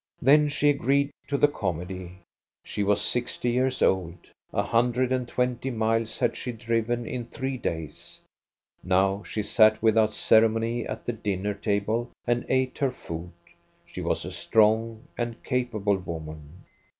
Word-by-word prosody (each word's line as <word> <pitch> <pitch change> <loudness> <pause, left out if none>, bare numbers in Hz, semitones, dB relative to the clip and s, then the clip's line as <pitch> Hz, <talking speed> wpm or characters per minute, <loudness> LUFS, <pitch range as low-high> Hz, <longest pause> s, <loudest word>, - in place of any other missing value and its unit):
" - - -43
Then 150 +3 +5
she 145 0 +3
agreed 140 +1 +1 0.2
to 140 - 0
the 145 - +5
comedy. 90 - -4 0.5
She - - -4
was 100 0 +2
sixty 120 0 -1
years 130 +1 +1
old; 90 -2 +1 0.3
a - - 0
hundred 125 +2 +1
and 130 -2 0
twenty 125 +1 -1
miles 115 -1 0
had 120 -3 +1
she 125 - -4
driven 115 +1 -1
in 120 0 -4
three 130 +2 -3
days. 80 - -5 0.6
Now 95 +2 +2
she 105 0 -4
sat 110 +1 +5
without 110 -1 +3
ceremony 115 +1 +3
at - - -6
the 120 - -1
dinner 105 -2 -2
table 105 +3 -1 0.2
and 120 0 0
ate 130 0 0
her 140 -2 +2
food; 85 -8 -7 0.5
she - - -8
was - - -1
a - - -5
strong 110 +1 +2 0.2
and 120 -1 -3
capable 110 -6 0
woman. 80 -1 -8
115 Hz, 150 wpm, -26 LUFS, 100-125 Hz, 0.6 s, Then